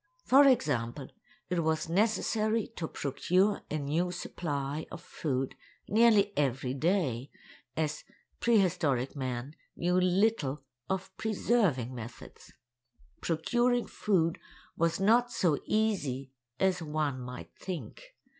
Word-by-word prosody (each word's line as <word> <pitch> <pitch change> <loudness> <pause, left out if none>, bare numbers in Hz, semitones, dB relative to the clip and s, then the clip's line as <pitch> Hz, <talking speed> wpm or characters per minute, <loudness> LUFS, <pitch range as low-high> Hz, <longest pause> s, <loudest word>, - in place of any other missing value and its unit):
For 280 +2 +7
example, 135 - +1 0.4
it 175 -2 0
was 160 0 0
necessary 215 +3 +1
to 160 - -3
procure 185 +10 +1
a 155 - -1
new 155 +5 0
supply 150 -4 -4
of 170 - -7
food 135 -6 -3 0.3
nearly 210 -2 +4
every 135 -2 0
day, 140 - 0 0.5
as 155 -1 -1 0.4
prehistoric 160 - +2
man 130 +1 -4 0.2
knew 180 +1 +2
little 180 -7 +1 0.3
of 190 0 -3
preserving 200 - +1
methods. 115 -1 -10 0.7
Procuring 240 +9 +1
food 170 -6 0 0.4
was 165 +1 +1
not 235 +5 +4
so 165 -7 +1
easy 145 - 0 0.3
as 190 -2 +2
one 150 -4 -1
might 125 0 -8
think. - - -7
165 Hz, 110 wpm, -30 LUFS, 140-205 Hz, 0.7 s, For